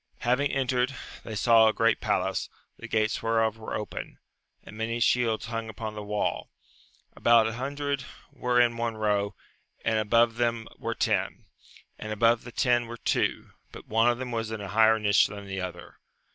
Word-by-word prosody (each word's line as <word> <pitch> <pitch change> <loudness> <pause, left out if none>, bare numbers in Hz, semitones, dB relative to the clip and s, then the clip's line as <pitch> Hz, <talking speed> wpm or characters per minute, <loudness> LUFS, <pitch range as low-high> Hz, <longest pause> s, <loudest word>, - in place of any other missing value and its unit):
Having 130 +4 +1
entered, 130 0 0 0.3
they 110 - -6
saw 115 +2 +5
a 110 - +3
great 115 0 +2
palace, - - -1 0.3
the - - -9
gates 110 0 0
whereof 115 -1 +1
were 110 - -5
open, 105 - -6 0.5
and - - -12
many 115 +2 -2
shields 115 -2 +2
hung 115 0 -4
upon 110 0 -6
the 105 - -6
wall; 105 0 -2 0.7
about 115 -1 +5
an 110 - -2
hundred 140 +2 -3 0.3
were 125 -3 0
in 120 -1 +3
one 115 -1 -2
row, 105 -1 0 0.5
and 110 -1 +2
above 115 +2 +3
them 115 -1 0
were - - -3
ten, - - -1 0.5
and 110 - -6
above 115 +2 +2
the 120 - -8
ten 120 -1 +1
were 120 +1 -7
two, - - -1 0.2
but - - -11
one 115 +2 +3
of 120 - +1
them 125 -1 -5
was 115 -1 -2
in 110 -1 -5
a 100 -1 -6
higher 110 +1 +5
nich 105 -1 +4
than 100 -1 -9
the 95 -1 -4
other. 90 -1 -8
115 Hz, 180 wpm, -27 LUFS, 110-120 Hz, 0.7 s, saw